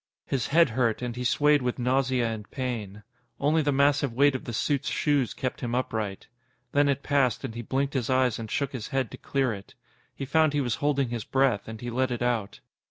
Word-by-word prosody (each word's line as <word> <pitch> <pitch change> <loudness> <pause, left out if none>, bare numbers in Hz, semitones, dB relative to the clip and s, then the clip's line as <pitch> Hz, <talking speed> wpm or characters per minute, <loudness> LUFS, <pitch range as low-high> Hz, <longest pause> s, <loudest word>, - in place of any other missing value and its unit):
His 130 -4 -1
head 165 0 +4
hurt, 115 0 0
and 120 -1 -3
he 125 - -4
swayed 145 +3 +3
with 125 -1 -1
nausea 130 -1 +1
and 110 -2 -5
pain. 110 -6 -4 0.4
Only 155 +3 +3
the 145 -1 +1
massive 140 0 +3
weight 140 +3 +4
of 130 - -5
the - - -4
suit's 135 +4 0
shoes 145 -5 +1
kept 130 - -3
him 120 -2 -2
upright. 110 -6 -2 0.5
Then 145 0 +3
it 140 0 0
passed, 140 -5 +1
and 130 -4 -4
he 120 - -5
blinked 135 +4 -1
his 130 -5 -1
eyes 130 -3 +2
and 110 -1 -6
shook 140 +3 -1
his 125 -5 -5
head 130 -6 -1
to - - -8
clear 135 -4 0
it. 100 -1 -11 0.4
He 135 - -5
found 155 +2 +3
he 145 - +1
was 120 -4 -1
holding 140 -3 +1
his 115 -2 -3
breath, 130 -6 +1
and 110 -1 -8
he 120 0 -4
let 130 +2 +1
it 120 -1 -2
out. 115 -5 -1
130 Hz, 225 wpm, -27 LUFS, 120-140 Hz, 0.5 s, head